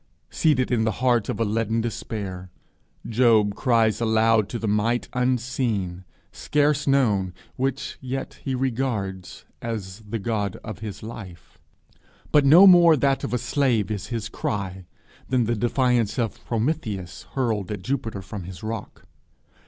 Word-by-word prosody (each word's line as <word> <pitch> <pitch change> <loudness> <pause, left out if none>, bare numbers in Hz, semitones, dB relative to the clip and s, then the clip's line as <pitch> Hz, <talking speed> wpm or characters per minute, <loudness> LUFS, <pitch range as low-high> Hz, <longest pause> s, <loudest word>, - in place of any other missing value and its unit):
Seated 130 -6 +2
in 115 -2 +2
the 110 -1 +1
heart 120 -4 +2
of - - -2
a 115 - +2
leaden 110 +1 0
despair, 100 -5 -4 0.6
Job 110 -3 +3
cries 115 -1 +2
aloud 110 -1 +3
to 120 - -3
the 115 - -3
Might 105 +4 +1
unseen, 120 -8 -1 0.3
scarce 150 0 +1
known, 105 -10 +2 0.2
which 135 0 -2
yet 130 +1 -5
he 130 - -1
regards 115 -8 -3 0.2
as 105 -5 -5
the 110 +1 -5
God 105 -2 -2
of 110 -3 -7
his 105 -2 -7
life. 100 -7 -10 0.7
But 145 -2 +5
no 170 +7 +9
more 175 -4 +8
that 135 0 +1
of - - -3
a 125 - +1
slave 120 -6 0
is 105 -3 -4
his 115 -3 -3
cry, 95 -4 -4 0.4
than 130 -2 +2
the 120 - 0
defiance 120 -1 +1
of 120 -1 -2
Prometheus 110 - -3
hurled 110 -7 -1
at 100 -3 -5
Jupiter 115 -5 -3
from 95 -1 -7
his 90 0 -9
rock. 110 -1 -6
115 Hz, 145 wpm, -24 LUFS, 105-130 Hz, 0.7 s, no